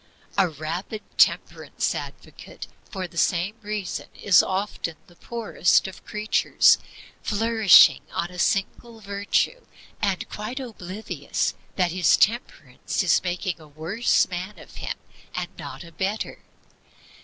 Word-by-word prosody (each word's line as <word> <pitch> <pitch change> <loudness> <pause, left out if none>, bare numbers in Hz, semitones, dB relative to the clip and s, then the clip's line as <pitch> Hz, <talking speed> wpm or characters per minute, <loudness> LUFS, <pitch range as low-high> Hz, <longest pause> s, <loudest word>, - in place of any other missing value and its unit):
A 190 -3 +3
rabid 165 +8 -5 0.2
temperance - - +2
advocate, - - -8 0.2
for 190 -2 -4
the 170 -1 -5
same 180 +3 +1
reason, 210 -3 -4
is 195 -5 +5
often 190 -3 -3
the 175 - -20
poorest 225 -3 +1
of 190 - -10
creatures, 215 0 +3 0.4
flourishing 220 -1 +6
on 170 +1 -2
a 180 - -9
single 225 +5 -1
virtue, 200 - -1 0.4
and 195 -3 0
quite 220 +6 -5
oblivious 215 -4 -3 0.2
that 180 -3 +1
his 180 -1 +4
Temperance 240 - 0
is - - +4
making 175 -1 -3
a 155 - -14
worse 165 +11 +1
man 185 +3 -5
of - - -14
him - - -4 0.4
and - - -2
not - - -8
a 170 - -13
better. 195 +5 -3
195 Hz, 125 wpm, -25 LUFS, 175-215 Hz, 0.4 s, flourishing